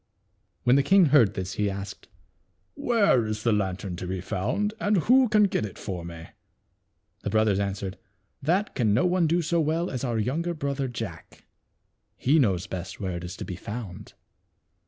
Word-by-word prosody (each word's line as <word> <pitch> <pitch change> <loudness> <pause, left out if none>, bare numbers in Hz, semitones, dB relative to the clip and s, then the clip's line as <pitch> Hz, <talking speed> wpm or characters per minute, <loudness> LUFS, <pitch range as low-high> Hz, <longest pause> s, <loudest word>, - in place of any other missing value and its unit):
When 125 +2 +5
the - - +5
king 190 +6 +5
heard 135 -9 +4
this 95 -1 -4
he 105 - +2
asked, 100 0 -7 0.4
" - - -45 0.2
Where 205 - +4
is 110 0 -4
the 115 - +3
lantern 95 -2 -2
to 90 - -5
be 95 +1 -3
found, 125 - -1
and 210 -1 +2
who 250 - +4
can 210 0 +5
get 195 - +1
it 100 -4 -6
for 90 -4 -5
me? 85 -1 -9 0.4
" - - -46
The - - -1
brothers 110 -1 +2
answered, 100 -1 -3 0.2
" 100 - -47
That 200 +4 0
can 110 -6 +2
no 180 - +3
one 180 -2 +2
do 170 +2 +1
so 170 +1 +1
well 160 +3 0
as 130 -1 -4
our 120 -3 -1
younger 160 +10 -1
brother, 140 -2 -2
Jack; 120 - -8 0.7
he 145 +5 +3
knows 95 - +2
best 95 -1 -6
where 95 -3 -3
it 85 - -7
is 90 +2 -7
to - - -6
be 90 - -5
found." 105 -1 -8
115 Hz, 195 wpm, -26 LUFS, -, 0.7 s, When